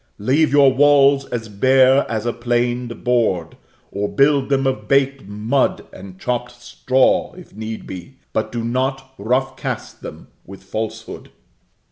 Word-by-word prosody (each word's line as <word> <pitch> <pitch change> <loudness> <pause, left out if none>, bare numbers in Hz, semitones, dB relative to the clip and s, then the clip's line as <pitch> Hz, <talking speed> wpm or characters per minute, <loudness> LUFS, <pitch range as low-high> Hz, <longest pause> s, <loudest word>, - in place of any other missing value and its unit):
Leave 135 +9 +1
your 140 -2 +5
walls 140 0 +4
as 115 -2 -5
bare 130 +6 +3
as 110 0 -3
a 120 - -1
planed 120 0 -2
board, 110 -9 0 0.4
or 100 +1 -2
build 140 -1 +2
them 135 -1 +1
of 105 -6 -2
baked 135 -2 +1
mud 110 +6 -1
and 95 -1 -11
chopped 120 0 -4
straw, 130 +2 +1
if 180 - -14
need 110 +1 -6
be; 95 +8 -9 0.2
but 110 - -2
do 120 -1 -4
not 130 +2 -2
rough 125 +6 -1
cast - - -6
them - - -10
with 95 +1 -13
falsehood. 110 0 -6
125 Hz, 145 wpm, -19 LUFS, 110-135 Hz, 0.4 s, your